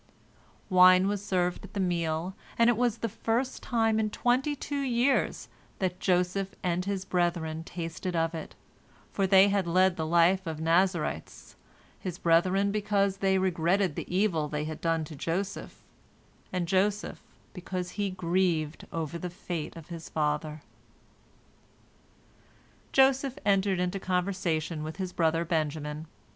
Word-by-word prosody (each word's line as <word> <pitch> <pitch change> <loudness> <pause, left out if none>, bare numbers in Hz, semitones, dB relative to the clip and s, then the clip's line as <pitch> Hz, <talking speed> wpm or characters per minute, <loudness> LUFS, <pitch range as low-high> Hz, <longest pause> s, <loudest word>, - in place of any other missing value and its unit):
Wine 185 0 +6
was 205 0 -2
served 180 -3 -1
at 200 - -12
the - - -1
meal, 170 -1 -1 0.2
and 235 +1 +5
it - - 0
was 235 -1 +1
the 230 - -2
first 230 +5 -2
time 225 -2 +1
in 215 -1 +1
twenty 255 +7 +1
two 285 +1 -4
years 255 +1 +1 0.3
that 185 -1 -2
Joseph 185 +1 0
and 180 0 0
his 195 -1 -2
brethren 170 -3 -1
tasted 170 +1 -5
of 165 0 +1
it, 160 - -7 0.6
for 195 -1 0
they 195 +1 +6
had 195 -3 0
led 185 +1 +3
the 160 - -1
life 175 +3 +3
of 160 -1 -4
Nazarites, 170 +1 0 0.4
his 180 -2 -5
brethren 185 +4 +3
because 200 -2 +1
they 190 -1 +2
regretted 185 0 +1
the - - -6
evil 180 -5 +1
they 150 0 -3
had 155 0 -6
done 165 -1 +1
to 155 0 -9
Joseph, 190 +7 -4 0.7
and 180 -2 -1
Joseph 200 +3 0 0.3
because 180 -1 -5
he 205 -1 -2
grieved 175 -4 -1
over 165 0 -4
the 180 - -4
fate 175 -3 -5
of 165 -1 -11
his 165 -2 -8
father. 150 0 -2 2.3
Joseph 270 0 +3
entered 195 -2 +2
into 180 +2 -1
conversation 180 -4 -1
with 155 +1 -5
his 185 -2 -4
brother 165 0 +1
Benjamin. 155 -1 -2
180 Hz, 145 wpm, -28 LUFS, 165-200 Hz, 2.3 s, Wine